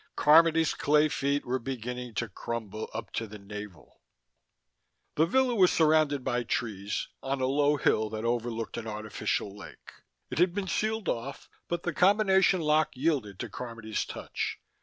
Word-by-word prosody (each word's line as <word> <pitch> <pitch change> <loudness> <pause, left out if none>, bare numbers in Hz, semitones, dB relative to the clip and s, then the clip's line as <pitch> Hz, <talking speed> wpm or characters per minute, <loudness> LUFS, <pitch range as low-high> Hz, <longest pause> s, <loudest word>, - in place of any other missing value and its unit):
Carmody's 160 +1 +5
clay 150 +1 +3
feet 140 0 -1
were 130 +2 -1
beginning 125 -1 -5
to 115 - -1
crumble 110 +1 -5
up 110 -2 -6
to 115 - -3
the 105 +1 -9
navel! 105 -2 -10 1.1
The 160 +2 +3
villa 260 +5 +2
was 190 -5 +5
surrounded 155 -3 +3
by 125 -2 0
trees, 105 -4 -3
on 135 0 -2
a 130 - +1
low 145 +2 +2
hill 110 -5 +2
that 110 +1 -4
overlooked 115 -1 -2
an 115 -1 -5
artificial 105 -1 -3
lake. 105 - -12 0.4
It - - -2
had 175 0 +3
been 200 -2 -2
sealed 215 +2 -1
off, 125 +4 -3 0.2
but 170 0 -3
the 175 - -2
combination 190 -1 +4
lock 155 0 +3
yielded 130 - 0
to - - -5
Carmody's 115 -3 -4
touch. - - -4
130 Hz, 160 wpm, -29 LUFS, 110-160 Hz, 1.1 s, Carmody's